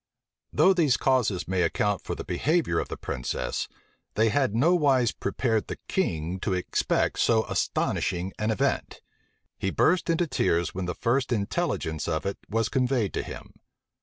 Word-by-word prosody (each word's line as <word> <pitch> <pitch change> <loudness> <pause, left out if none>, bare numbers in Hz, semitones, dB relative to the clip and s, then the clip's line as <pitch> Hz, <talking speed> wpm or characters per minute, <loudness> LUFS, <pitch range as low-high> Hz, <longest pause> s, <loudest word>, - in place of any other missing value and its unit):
Though 190 - +5
these 155 -9 +3
causes 125 -8 +1
may 95 -1 0
account 100 +4 +1
for - - -4
the - - -6
behavior 155 - +1
of - - -4
the - - -5
princess, 60 -1 -3 0.5
they 110 +2 +3
had 130 -3 +1
nowise 140 -4 +3
prepared 110 -4 -1
the - - -4
king 80 +4 -1
to 95 0 -1
expect 90 - 0
so 110 -1 +3
astonishing 90 +2 -1
an 105 +1 0
event. 110 - -1 0.6
He 95 - 0
burst 180 - +2
into 165 +1 +2
tears 85 - 0
when 95 0 -3
the 90 -1 -3
first 125 +3 0
intelligence 100 - -1
of 80 0 -1
it 100 - -3
was 115 +1 +1
conveyed 125 -6 0
to - - -1
him. - - -9
110 Hz, 160 wpm, -27 LUFS, 90-135 Hz, 0.6 s, Though